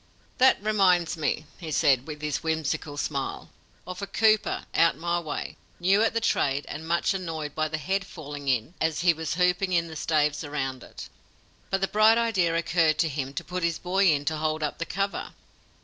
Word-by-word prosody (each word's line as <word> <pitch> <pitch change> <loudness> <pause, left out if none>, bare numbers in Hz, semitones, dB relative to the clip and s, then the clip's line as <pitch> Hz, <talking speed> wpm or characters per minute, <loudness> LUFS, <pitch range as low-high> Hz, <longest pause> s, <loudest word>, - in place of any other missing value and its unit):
"That 260 +1 +6
reminds 185 -6 +3
me," 155 -1 -1
he 165 - -7
said, 140 -3 +2
with 150 -1 -7
his 150 -2 -1
whimsical 160 -2 -2
smile, 140 -2 -3 0.3
"of 185 +1 -7
a 200 - -4
cooper 215 +1 +2
out 165 - +3
my 170 +1 -1
way, 155 -3 -5 0.2
new 190 +4 +3
at 225 0 +1
the - - +3
trade 140 -10 0
and 160 +2 -7
much 170 +3 +1
annoyed 160 -6 -4
by 155 0 0
the 155 +1 -3
head 190 +6 -1
falling 145 -3 -8
in 125 +4 0
as 160 -1 0
he 175 -1 +5
was 160 -1 -4
hooping 180 +1 +1
in 170 -1 +1
the 160 - -8
staves 150 -1 +1
around 135 -3 -4
it. - - -10 0.6
But 195 0 0
the 195 - +2
bright 215 +2 +5
idea 195 -8 +1
occurred 165 -2 +2
to 165 - +2
him 135 -2 -4
to - - -3
put 180 0 -4
his 170 -1 0
boy 190 +2 +1
in 145 -1 0
to 155 +1 -1
hold 155 0 -1
up 150 - -3
the 170 - -3
cover. 195 0 -3
165 Hz, 200 wpm, -26 LUFS, 150-185 Hz, 0.6 s, That